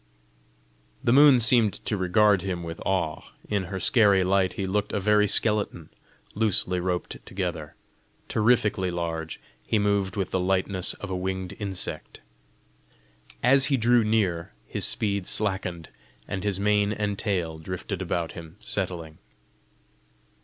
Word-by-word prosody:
The 120 - +3
moon 140 -2 +7
seemed 115 -2 +3
to 105 - 0
regard 100 +1 +3
him 90 -2 -4
with 85 0 -7
awe; 90 -5 -1 0.3
in 100 -3 -1
her 95 +1 -5
scary 100 -4 +4
light 95 -1 +1
he 95 - -3
looked 105 +2 -2
a - - 0
very 105 +1 +3
skeleton, 105 -6 +1 0.4
loosely 100 -4 +4
roped 90 0 -3
together. 85 -5 -5 0.5
Terrifically 105 -4 +2
large, 80 -2 -4 0.2
he 110 - 0
moved 100 -2 0
with 95 -2 -2
the 95 - 0
lightness 95 0 0
of 105 - -8
a - - -1
winged 95 0 -3
insect. 100 -3 -3 1.2
As 135 +2 +5
he 140 - +2
drew 120 0 +3
near, 95 - 0
his - - -2
speed 100 -3 -1
slackened, 95 -5 -2 0.4
and 100 0 -4
his 100 -2 0
mane 105 0 +2
and 105 -1 -2
tail 85 -6 -2
drifted 90 +3 -5
about 85 -2 -2
him 80 -2 -11
settling. 80 -3 -4
95 Hz, 140 wpm, -26 LUFS, 90-105 Hz, 1.2 s, moon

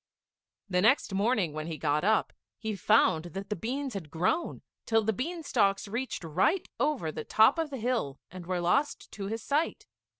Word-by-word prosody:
The 180 -2 +1
next 220 0 +3
morning 200 -5 +1
when 155 +1 -4
he 160 -2 -4
got 150 +2 0
up, 215 +3 +2 0.2
he 220 -2 -3
found 160 -3 +3
that 195 +2 -6
the - - +1
beans 260 +7 -3
had 180 -7 -6
grown, 180 - -1 0.2
till 225 -1 +3
the 220 +1 +1
bean 330 - -4
stalks 200 -8 +1
reached 235 0 -3
right 185 - +1
over 255 - 0
the 155 - -5
top 220 - +4
of 325 -2 -1
the 275 - -5
hill, 225 - -1
and 180 -1 -9
were 180 -1 -1
lost 275 +12 0
to 195 -2 -5
his 220 +1 -4
sight. 300 +4 -1
210 Hz, 190 wpm, -29 LUFS, 175-255 Hz, 0.2 s, top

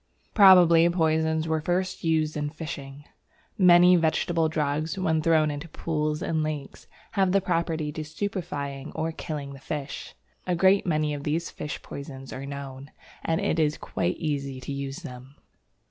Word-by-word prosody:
Probably 175 -5 +7
poisons 160 -1 +1
were 160 -1 0
first 185 +3 -1
used 160 -2 +1
in 150 -1 -2
fishing. 145 -3 -8 0.5
Many 180 -2 +7
vegetable 165 0 +1
drugs, 155 +3 -1
when 160 -4 +1
thrown 155 -1 +3
into 145 +3 -6
pools 150 -1 -2
and 160 -1 0
lakes, 155 -2 -5 0.2
have 190 -3 +2
the 195 - +5
property 165 -4 -1
of 155 -1 -5
stupefying 155 -6 -4
or 160 +1 -1
killing 145 -3 -6
the 135 - -11
fish. 145 0 -6 0.3
A 180 - +1
great 190 +3 +4
many 155 -2 +1
of 145 -1 -5
these 160 +4 -2
fish 150 - -6
poisons 135 -2 -8
are 135 +1 -6
known, 140 0 -7 0.3
and 165 0 0
it 165 - 0
is 155 -1 +1
quite 90 - -2
easy 140 -4 -3
to 140 - -5
use 140 +4 -5
them. 130 -1 -10
155 Hz, 160 wpm, -26 LUFS, 145-170 Hz, 0.5 s, Probably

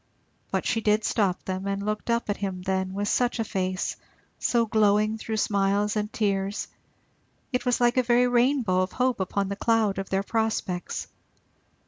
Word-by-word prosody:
But - - -1
she 225 - +1
did 210 0 +2
stop 195 -5 0
them, 190 +1 -3
and 200 0 -2
looked 215 +2 -3
up 235 0 +1
at 205 - -1
him 190 -2 -4
then 190 0 -1
with 205 +1 -1
such 245 +3 +1
a 225 - 0
face 185 -3 -2 0.4
so 235 -1 +2
glowing 215 0 +2
through 220 0 -3
smiles 200 0 +1
and 210 0 -1
tears 200 -1 -1 0.9
it 250 0 -1
was 245 - +2
like 240 +1 +3
a - - +6
very 245 0 +3
rainbow 245 -6 +2
of 185 - -2
hope 255 -2 +1
upon 195 +1 -1
the 200 - -2
cloud 220 -3 +1
of 195 - -5
their 195 0 0
prospects. 215 -5 -2
210 Hz, 175 wpm, -26 LUFS, 195-230 Hz, 0.9 s, a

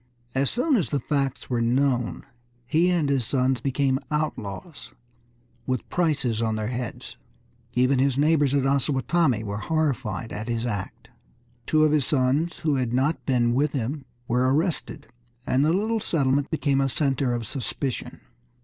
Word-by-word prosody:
As 135 +1 +1
soon 260 +3 +2
as 180 - -1
the 145 - 0
facts 135 0 -2
were 120 -2 0
known 125 +1 +1 0.4
he 160 +8 +3
and 170 -5 +1
his 135 -3 +1
sons 130 +1 0
became 135 -1 +1
outlaws 150 - -4 0.8
with 130 -2 -2
prices 140 -10 0
on 110 -1 0
their 110 0 -2
heads. 120 -2 -5 0.6
Even 130 +1 +3
his 135 -1 +2
neighbors 145 -2 +3
at 135 -2 +2
Osawatomie 135 -1 +1
were 100 0 -4
horrified 125 - -1
at 110 +2 -5
his 115 0 -1
act. 105 -5 -5 0.6
Two 155 0 +4
of 155 - +4
his 150 -4 +2
sons 145 +4 +1
who 150 -3 +1
had 125 -2 -1
not 140 +6 +1
been 120 -3 +2
with 140 +4 +1
him 135 +2 -3 0.2
were 125 +2 +2
arrested, 160 +4 -1 0.4
and 130 +2 +2
the 155 - +3
little 220 +5 +1
settlement 140 -6 +1
became 140 -3 +1
a 135 - +1
center 135 -3 0
of 120 -1 -4
suspicion. 130 +2 -4
135 Hz, 160 wpm, -25 LUFS, 125-150 Hz, 0.8 s, Two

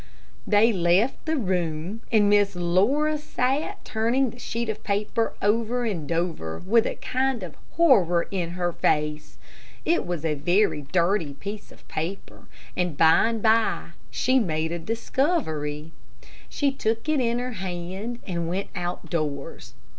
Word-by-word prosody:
They 220 +2 +5
left 185 - +2
the 320 - +1
room, 180 - -2
and 215 -3 +5
Miss 205 -1 +3
Laura 220 - +2
sat 290 +7 -2
turning 235 +3 +1
the 240 - -14
sheet 235 -1 -3
of 220 -1 -4
paper 210 +2 0
over 230 +4 +1
and 170 -9 -3
over, 165 - -2
with 225 +5 +2
a - - -3
kind 260 -4 -1
of 170 -4 -7 0.2
horror 195 - +4
in 175 -3 -2
her 175 -1 0
face. 150 -1 0 0.5
It 340 +2 +2
was 175 -3 -4
a 155 - +1
very 175 +3 +2
dirty 170 0 0
piece 205 +7 -7
of - - -18
paper, 170 +5 -5 0.3
but 175 -5 -1
by 160 +6 +6
and 225 -2 -3
by 220 -7 +2 0.2
she 255 - +2
made 160 -6 -1
a 170 - -3
discovery. 160 - -1 0.6
She 285 -2 +1
took 225 -1 -2
it 310 -2 +2
in 235 -1 +1
her 250 0 -3
hand 190 +5 -4
and 170 -3 -2
went 190 +3 -2
out 175 0 -4
doors. 145 -6 -4
200 Hz, 150 wpm, -25 LUFS, 170-235 Hz, 0.6 s, by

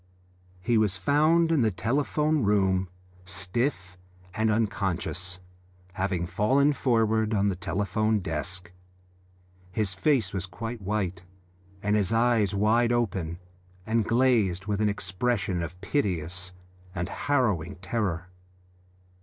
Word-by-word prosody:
He 115 +3 +2
was 100 -3 +1
found 155 - +3
in 160 -5 +3
the 110 - +3
telephone 145 - 0
room 95 -3 +2 0.3
stiff 95 +1 -3 0.3
and 110 0 +1
unconscious, 95 -5 -1 0.6
having 95 -2 -1
fallen 135 +10 +2
forward 110 -4 +1
on 100 0 +2
the 95 - -1
telephone 105 +5 0
desk. 90 +1 -4 1.0
His 100 0 -1
face 105 -1 +1
was 95 -1 -2
quite 115 +5 -6
white, 95 -3 -2 0.6
and 105 +1 +2
his 100 -2 +1
eyes 115 -3 +2
wide 115 +4 +3
open 95 -9 -1 0.5
and 115 0 +1
glazed 115 -7 +2
with 105 0 -1
an 105 - +3
expression 100 -1 -1
of 85 +2 -6
piteous 90 - -2 0.4
and 85 0 -2
harrowing 110 - 0
terror. 90 -1 -2
105 Hz, 115 wpm, -27 LUFS, 90-115 Hz, 1.0 s, found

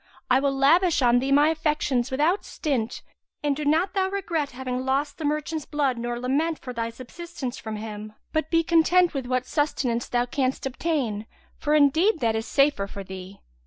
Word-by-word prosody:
I 255 - +6
will 280 0 +1
lavish 320 +3 +4
on 245 0 +5
thee 270 +2 -1
my 290 +2 +5
affections 300 -6 0
without 305 +9 +1
stint; 260 -8 -3 0.4
and 290 -1 +1
do 300 - -4
not 320 +6 +2
thou 380 -1 +1
regret 340 -7 -2
having 255 0 -4
lost 280 +3 -1
the 315 - -3
merchant's 300 +1 -2
blood 280 -5 0
nor 240 0 -3
lament 295 +6 0
for 250 - -8
thy 230 -1 -2
subsistence 260 +2 -7
from 220 -1 -5
him, 215 0 -7 0.2
but 315 0 0
be 330 -1 +3
content 340 +2 +4
with 270 -3 -3
what 255 0 0
sustenance 255 -6 -1
thou 245 0 +1
canst 260 +1 -1
obtain; 255 -7 -2 0.3
for 300 0 +1
indeed 315 +7 +4
that 225 -4 +1
is 220 +1 -3
the - - -10
safer 275 -8 +3
for 200 0 -7
thee. 190 +1 -10
275 Hz, 190 wpm, -25 LUFS, 245-315 Hz, 0.4 s, I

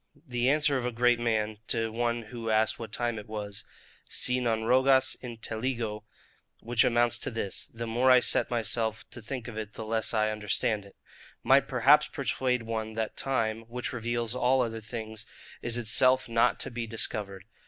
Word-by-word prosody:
The 125 0 +1
answer 145 -1 +3
of 125 - -3
a - - -2
great 120 0 +2
man, 110 -2 -1
to 115 0 +1
one 120 +1 -1
who 115 +1 -6
asked 110 0 +2
what 115 -2 -7
time 115 -1 -2
was: 105 -2 -5 0.5
Si 125 0 +3
non 115 -3 0
rogas 130 +2 +4
intelligo, 115 -2 -4 0.5
(which 115 0 +2
amounts 120 0 +2
to - - -2
this; 115 -5 -4
The 115 +1 -6
more 120 +3 +2
I 130 0 +8
set - - +3
myself 115 -1 -2
to 120 - -8
think 120 +1 -6
of 110 -2 -6
it, 110 0 -7
the 110 - -7
less 110 0 0
I 110 -1 +1
understand 105 0 -1
it,) 100 - -17 0.5
might - - +4
perhaps - - +5
persuade 125 -2 -1
one 110 -1 -4
that 110 0 -3
time, 115 -5 -1
which 125 +2 -5
reveals 120 -1 -1
all 125 +1 +2
other 115 -1 -4
things, 110 -1 -6 0.3
is 120 0 +1
itself 130 +3 +4
not 115 0 +2
to - - -1
be 120 -1 -4
discovered. 100 -4 -4
115 Hz, 175 wpm, -28 LUFS, 110-120 Hz, 0.5 s, I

